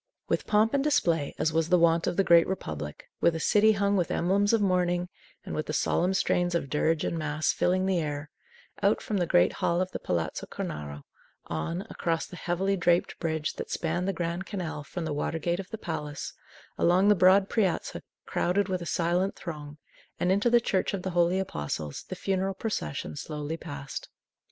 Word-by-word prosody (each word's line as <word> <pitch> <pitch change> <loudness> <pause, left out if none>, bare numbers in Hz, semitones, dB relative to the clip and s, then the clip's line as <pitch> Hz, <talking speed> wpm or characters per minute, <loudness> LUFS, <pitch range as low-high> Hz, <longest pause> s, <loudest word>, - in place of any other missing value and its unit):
With - - -1
pomp 215 +1 +3
and 275 -1 +2
display, 170 - +1
as 160 - 0
was 165 0 +1
the 180 - +5
wont 170 0 +3
of - - -1
the 195 - +4
Great 170 -2 +6
Republic, 75 - -5
with 170 - +3
a - - -2
city 215 +5 +4
hung 200 0 +1
with 180 -4 +1
emblems 200 +4 +2
of 230 - +4
mourning, 180 -2 +1 0.4
and - - -5
with 155 - -2
the 150 - -3
solemn 180 +4 +1
strains 175 -2 +1
of 140 -5 -2
dirge 155 +1 +1
and 165 - -1
mass 155 0 0
filling 185 +1 +1
the 190 -2 +2
air, 150 -1 -4 0.5
out - - +3
from 210 - -2
the 175 -2 +1
great 90 - +4
hall 170 +1 +2
of 185 0 -1
the - - -4
Palazzo 85 -2 -2
Cornaro, 75 -1 -6 0.4
on, 85 - -3
across 165 -6 -1
the - - -11
heavily 185 +3 0
draped 175 -1 +1
bridge 160 -2 -1
that - - -5
spanned 175 +3 -1
the - - +2
Grand 175 +1 -3
Canal 170 -7 -4
from 170 +3 -5
the 155 - -2
water 145 +2 -1
gate 170 +3 -1
of 195 - -6
the 220 - -5
palace, 150 -6 -5 0.5
along 180 +3 +4
the - - +8
broad 190 +1 +5
piazza 200 -6 0 0.2
crowded 190 +3 0
with 185 -1 -1
a 170 - -5
silent 175 +4 +1
throng, 150 -4 -7 0.4
and 180 - +2
into 205 +5 +3
the 240 0 +6
Church 200 -3 0
of 185 - -6
the 190 - -2
Holy 175 +1 +3
Apostles, 75 - -4
the 185 - -4
funeral 190 +1 -1
procession 75 - -3
slowly 150 - -4
passed. 145 -4 -7
175 Hz, 200 wpm, -28 LUFS, 155-190 Hz, 0.5 s, the